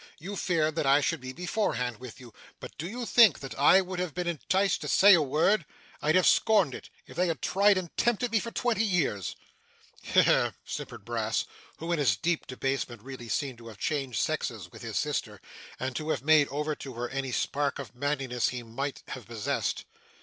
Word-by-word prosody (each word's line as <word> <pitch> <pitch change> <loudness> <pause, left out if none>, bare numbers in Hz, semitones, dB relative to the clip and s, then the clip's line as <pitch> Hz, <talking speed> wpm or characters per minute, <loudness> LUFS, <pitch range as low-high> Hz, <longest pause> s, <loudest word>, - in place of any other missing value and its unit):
You 195 +6 -7
feared 160 -5 +1
that 150 - +1
I 140 +1 +6
should 140 - -1
be 130 0 -6
beforehand 130 - -2
with 125 +1 -10
you. 120 -4 -13 0.3
But - - -10
do 165 +4 -4
you 240 +3 -5
think 225 - +6
that 135 - -7
I 145 +7 +6
would 185 -1 -5
have 180 -4 -3
been 180 0 -2
enticed 175 +3 0
to 150 - -5
say 200 +6 +7
a 170 - +6
word! 155 +7 +2 0.4
I'd 155 +2 +2
have 185 - +4
scorned 200 - +4
it, - - -9 0.2
if - - -13
they 180 +2 +2
had 165 -5 -2
tried 200 - +3
and 180 -3 -5
tempted 240 0 +1
me 225 - +3
for 230 - -5
twenty 230 -2 0
years.' 165 - 0 0.7
'He - - +4
he!' - - +3 0.2
simpered - - -7
Brass, - - -1 0.3
who, 165 +2 -4
in 170 - +1
his 145 - +3
deep 170 -1 -1
debasement, 130 -4 -3
really 130 -3 -9
seemed 130 -2 -2
to 115 - -12
have 110 -3 -10
changed 135 -1 -2
sexes - - -2
with - - -12
his - - -4
sister, - - -2 0.4
and 130 0 -3
to 155 0 -4
have 135 -5 -1
made 155 -1 +5
over 150 +2 -2
to 130 -3 -8
her 120 +1 -3
any 135 -1 -3
spark 140 +3 -1
of 135 -7 -8
manliness 135 -2 -1
he 125 -1 -5
might 135 +5 -5
have 125 -6 -7
possessed. 110 -3 -2
150 Hz, 210 wpm, -28 LUFS, 130-180 Hz, 0.7 s, say